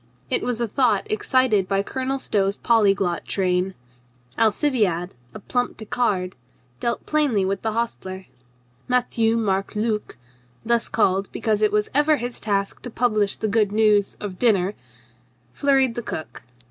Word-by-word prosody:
It -, -, +2 dB
was 245 Hz, -2 st, -2 dB
a 235 Hz, -, 0 dB
thought 225 Hz, -3 st, +2 dB
excited 215 Hz, -3 st, +2 dB
by 195 Hz, +1 st, +1 dB
Colonel 260 Hz, +4 st, -2 dB
Stow's 200 Hz, -6 st, 0 dB
polyglot 200 Hz, -6 st, +2 dB
train. 185 Hz, 0 st, 0 dB, 0.6 s
Alcibiade, 215 Hz, -, +1 dB, 0.2 s
a -, -, -6 dB
plump 245 Hz, +4 st, -2 dB
Picard, 205 Hz, -4 st, -1 dB, 0.4 s
dealt 235 Hz, -, -2 dB
plainly 280 Hz, -11 st, +1 dB
with 195 Hz, 0 st, -2 dB
the 220 Hz, -1 st, -1 dB
hostler. 190 Hz, -5 st, -4 dB, 0.6 s
Matthieu 235 Hz, -2 st, +1 dB
Marc 195 Hz, -2 st, -1 dB
Luc 215 Hz, 0 st, -2 dB, 0.5 s
(thus 235 Hz, 0 st, +1 dB
called 195 Hz, -3 st, +1 dB
be -, -, -6 dB
cause 215 Hz, -2 st, +1 dB
it 215 Hz, -, +3 dB
was 210 Hz, 0 st, 0 dB
ever 295 Hz, +2 st, +4 dB
his 245 Hz, -1 st, -5 dB
task 200 Hz, -2 st, -2 dB
to 245 Hz, -, -7 dB
publish 215 Hz, -4 st, +1 dB
the 220 Hz, -, -2 dB
good 210 Hz, -1 st, +2 dB
news 210 Hz, -2 st, +2 dB
of 195 Hz, -3 st, -6 dB
dinner) 200 Hz, -5 st, +3 dB, 0.8 s
flurried 270 Hz, -3 st, +2 dB
the 240 Hz, -, -4 dB
cook. 160 Hz, -8 st, -7 dB
215 Hz, 145 wpm, -23 LUFS, 195-240 Hz, 0.8 s, ever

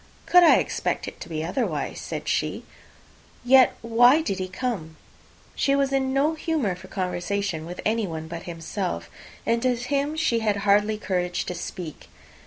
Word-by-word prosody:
"Could 360 Hz, -, +7 dB
I 340 Hz, -, +7 dB
expect -, -, -1 dB
it -, -, -8 dB
to -, -, -8 dB
be 155 Hz, -1 st, -3 dB
otherwise?" 185 Hz, +10 st, -2 dB
said -, -, -5 dB
she. -, -, -1 dB, 0.8 s
"Yet 260 Hz, 0 st, +6 dB
why 245 Hz, +6 st, +5 dB
did 195 Hz, -, -2 dB
he 185 Hz, -, -2 dB
come?" 185 Hz, -6 st, -4 dB, 0.6 s
She 275 Hz, -, +2 dB
was 275 Hz, -1 st, +1 dB
in 265 Hz, -1 st, +1 dB
no 280 Hz, +4 st, +2 dB
humour 310 Hz, -, -1 dB
for 185 Hz, +1 st, -11 dB
conversation 180 Hz, -2 st, -2 dB
with 175 Hz, +1 st, -8 dB
anyone 195 Hz, -8 st, -1 dB
but 170 Hz, +1 st, -7 dB
himself; 165 Hz, -, -4 dB, 0.3 s
and 230 Hz, 0 st, +1 dB
to 255 Hz, 0 st, +2 dB
him 280 Hz, +5 st, -1 dB
she 315 Hz, -8 st, +1 dB
had 210 Hz, -2 st, 0 dB
hardly 210 Hz, +1 st, +3 dB
courage 180 Hz, -4 st, -2 dB
to -, -, -3 dB
speak. 175 Hz, -2 st, -7 dB
210 Hz, 165 wpm, -25 LUFS, 180-265 Hz, 0.8 s, Could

